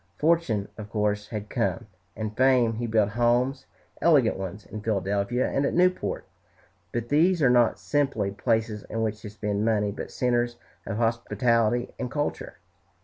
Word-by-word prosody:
Fortune, 150 -11 +1
of 105 -1 -7
course, 105 -1 -1
had 105 -1 -5
come, 115 0 -1 0.3
and 110 -1 -4
fame. 130 -2 +4
He 120 0 -2
built 110 -2 +2
homes, 120 +4 +1 0.3
elegant 145 -9 +4
ones, 95 +2 -6
in 110 - -7
Philadelphia 100 +3 0
and 140 - 0
at - - 0
Newport, 180 +1 +1 0.7
but 120 0 -3
these 170 +5 +3
are 135 -5 +4
not 120 -2 +4
simply 135 -9 0
places 110 0 -1
in 115 +1 -2
which 110 -1 -2
to 105 - -7
spend 105 0 -2
money, 105 -2 +1
but - - -6
centres 120 -1 0 0.3
of 105 - -3
hospitality 115 0 +1
and 125 - -3
culture. 145 +2 -3
115 Hz, 155 wpm, -26 LUFS, 105-125 Hz, 0.7 s, fame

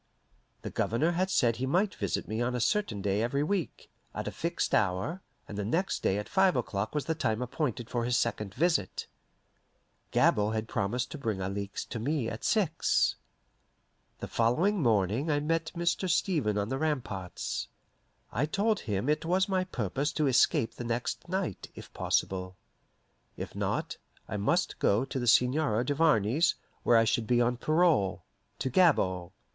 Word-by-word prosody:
The - - -5
Governor 145 +10 +1
had 185 +2 0
said 120 -10 +2
he 130 +2 -2
might 190 +8 +2
visit - - -2
me 110 +2 -2
on 125 +1 0
a - - -1
certain 115 - 0
day 100 +1 +1
every 140 +5 0
week, 185 0 -2 0.3
at - - -4
a - - -2
fixed - - -2
hour, 95 - +1 0.3
and 105 - -6
the - - -1
next 165 - -1
day 95 - +1
at 105 - -4
five 190 -1 +3
o'clock 110 -1 -2
was 150 - -1
the 165 - 0
time 110 -8 -1
appointed 125 -2 -2
for 120 -1 -2
his 120 0 +1
second 100 -3 -2
visit. 170 +4 0 1.1
Gabord 105 +1 +3
had 110 0 -2
promised 115 +5 -2
to 155 - -6
bring 110 -7 -2
Alixe 100 +1 -4
to 115 - -6
me 135 +1 -1
at 115 0 -6
six. 180 -7 +2 1.0
The - - -6
following 165 - +2
morning 110 - +1
I 145 -1 +2
met 165 +2 -1
Mr. 170 +2 0
Stevens 155 - +1
on 100 +1 -1
the 135 +1 -2
ramparts. 120 - -3 0.6
I 135 +8 0
told 205 +5 +1
him 105 +1 -2
it 150 +1 +1
was 185 +4 +2
my 185 -2 0
purpose 135 - -2
to 155 - +1
escape 125 -3 +3
the - - -7
next 120 +8 -3
night, 185 - -3
if - - -11
possible. 95 -1 -1 0.8
If - - -6
not, - - -2 0.3
I - - -3
must 170 - 0
go 110 +6 +2
to 135 - -4
the 120 - -2
Seigneur 125 -1 +3
Duvarney's, 145 - +2 0.3
where 120 - +4
I 115 - +5
should 115 0 0
be 120 0 +3
on 120 0 +2
parole 155 - +2 0.3
to 130 - -2
Gabord. 95 - +3
125 Hz, 170 wpm, -29 LUFS, 110-165 Hz, 1.1 s, I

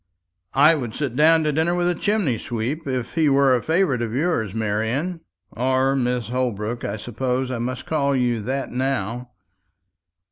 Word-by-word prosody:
"I 150 +4 +7
would 125 -8 -4
sit 140 -5 -3
down 160 +3 +5
to 155 - +1
dinner 160 +4 +1
with 175 0 +1
a 175 - +2
chimney 180 - 0
sweep, 125 +7 -4
if 130 -3 -3
he 160 -2 +3
were 135 -1 +4
a 120 - 0
favourite 160 -7 +1
of 115 -1 -3
yours, 130 - 0
Marian 110 - -1 0.3
or 130 +2 +1
Mrs. 125 -4 -1
Holbrook; 120 -2 -2
I 100 - -3
suppose 125 +3 -2
I 125 - -3
must 125 +2 -4
call 140 -3 +1
you 120 -3 +1
that 135 +5 -3
now." 125 -2 -2
130 Hz, 170 wpm, -22 LUFS, 120-150 Hz, 0.3 s, I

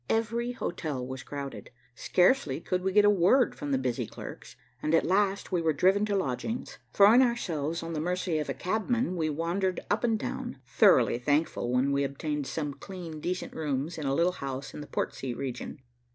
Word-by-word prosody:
Every 230 +2 0
hotel 155 - -3
was 130 +1 -6
crowded. 140 -1 -7 0.2
Scarcely 175 - +2
could 180 +2 -2
we 190 +1 0
get 205 +2 +5
a - - +7
word 205 +7 +4
from 145 -1 -5
the 135 - +3
busy 130 -2 -2
clerks, - - -9 0.3
and 155 +2 +2
at - - +3
last 195 +2 +1
we 180 -2 +1
were 160 -1 +2
driven 195 +7 +3
to 205 - 0
lodgings. 195 - -3
Throwing 210 +5 +7
ourselves 170 - 0
on 165 0 -5
the 155 - -2
mercy 180 -1 -1
of 150 - -3
a - - 0
cabman 220 - -1
we 160 -3 0
wandered 175 +5 -1
up 205 - +1
and 225 -2 +2
down, - - -5
thoroughly 120 - +4
thankful 145 -2 0
when 130 +2 +2
we 140 0 +2
obtained 140 +1 -3
some 150 -3 -3
clean, 165 +1 -8
decent 180 +4 -3
rooms 150 +1 -2
in 145 - -3
a 135 - +1
little 170 +3 +3
house 135 -4 -6
in - - -7
the 145 - -8
Portsea 125 -3 -3
region. 135 +2 -5
165 Hz, 195 wpm, -29 LUFS, 140-195 Hz, 0.3 s, a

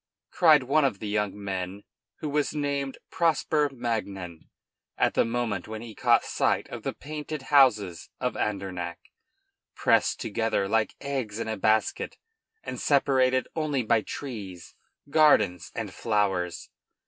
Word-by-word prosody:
cried 155 -5 +5
one 145 +4 +3
of 130 -8 +1
the 110 - -7
two 105 - -3
young 105 -1 -1
men, 95 0 -4 0.4
who 155 - -2
was 150 +1 0
named 140 -2 -2
Prosper 155 -2 +2
Magnan, 100 -9 -4 0.5
at - - +2
the - - +3
moment 115 -5 -2
when 110 +1 -6
he 115 -2 -9
caught - - +3
sight - - 0
of - - -7
the - - -2
painted 150 -1 -6
houses 105 - +4
of - - -1
Andernach, 95 -4 -3 0.8
pressed - - +2
together 110 -2 0
like 110 +1 +1
eggs 130 -7 -3
in 115 - -3
a 110 - -1
basket, 110 +2 0 0.5
and - - -5
separated 130 -2 +3
only 150 -5 0
by 115 0 +3
trees, 105 -10 -7 0.4
gardens, 105 - +4
and - - -4
flowers. 100 -6 -1
115 Hz, 140 wpm, -27 LUFS, 100-140 Hz, 0.8 s, cried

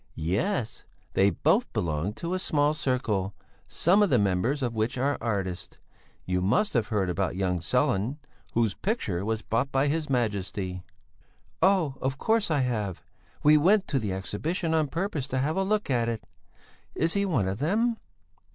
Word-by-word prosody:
"Yes, 110 - -1 0.3
they 95 +1 +4
both 85 - +1
belong 80 +4 -1
to 170 +9 -4
a 185 - 0
small 150 -4 +2
circle, 120 - -1 0.3
some 190 +5 +3
of 205 - +4
the 130 - +4
members 105 +8 +1
of 120 -2 -1
which 110 +3 -1
are 140 +3 +1
artists. 95 -5 -3 0.5
You 90 0 0
must 205 - +2
have 115 -5 +1
heard 105 -5 0
about 90 +1 -1
young 90 -2 0
Sellén, 100 - 0 0.4
whose 115 -4 +2
picture 110 - -2
was 110 0 -2
bought 125 +5 -1
by 135 +1 +2
his 155 0 -1
Majesty?" 100 -6 -1 0.8
"Of 155 -8 +2
course, 220 +4 +1
I 150 -4 +2
have! 105 -8 -2 0.4
We 150 +1 +7
went 190 +6 +4
to 135 - +1
the 105 -4 -2
Exhibition 155 - -2
on 155 -2 +2
purpose 165 -3 -2
to 130 - -2
have 145 +4 0
a 190 - +1
look 210 -4 0
at 120 -2 +1
it. 115 -2 -4 0.7
Is 165 +1 +1
he 200 - +2
one 145 - +1
of 95 +3 -3
them?" 225 - +1
125 Hz, 170 wpm, -27 LUFS, 100-160 Hz, 0.8 s, We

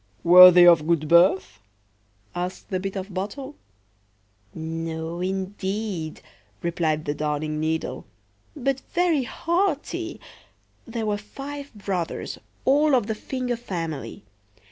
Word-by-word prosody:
"Were 180 +2 +10
they 180 0 +7
of 165 -3 +6
good 165 -3 +1
birth?" 175 +3 +4 0.7
asked 180 +3 -5
the 185 - 0
Bit 195 +1 -4
of 195 0 -5
Bottle."No, 235 +10 -5 1.7
indeed, 190 -2 -3 0.4
replied 160 -3 -1
the 145 - -1
Darning 150 0 -2
needle; 160 +1 -3 0.5
"but 275 -1 -1 0.2
very 340 -7 +2
haughty. 340 - -2 0.7
There 230 -1 -3
were 210 -1 0
five 280 +7 -8
brothers, 190 -5 -4 0.3
all 290 +1 +4
of 240 -5 +2
the 220 - -2
finger 250 +2 -3
family. 165 - -5
190 Hz, 110 wpm, -24 LUFS, 170-255 Hz, 1.7 s, Were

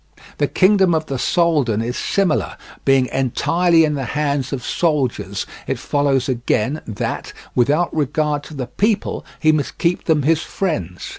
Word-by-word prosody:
The - - +2
kingdom 190 -2 +4
of 155 0 -1
the 135 -4 -4
Soldan 145 - +2
is 120 +2 -3
similar; 195 -5 0 0.3
being 135 -1 +4
entirely 165 +6 +2
in 150 - -1
the 135 -3 -3
hands 140 -3 0
of 130 -3 -4
soldiers, 150 -8 -1 0.2
it - - -1
follows 140 -3 0
again 125 +2 0
that, 110 - -4 0.2
without 150 +8 +2
regard 150 0 0
to 155 - -10
the 130 -3 -3
people, 210 - -1 0.2
he 155 - +4
must 155 -2 -2
keep 175 +1 0
them 155 -3 +2
his 160 +2 +2
friends. 90 - -3
150 Hz, 155 wpm, -19 LUFS, 130-165 Hz, 0.3 s, kingdom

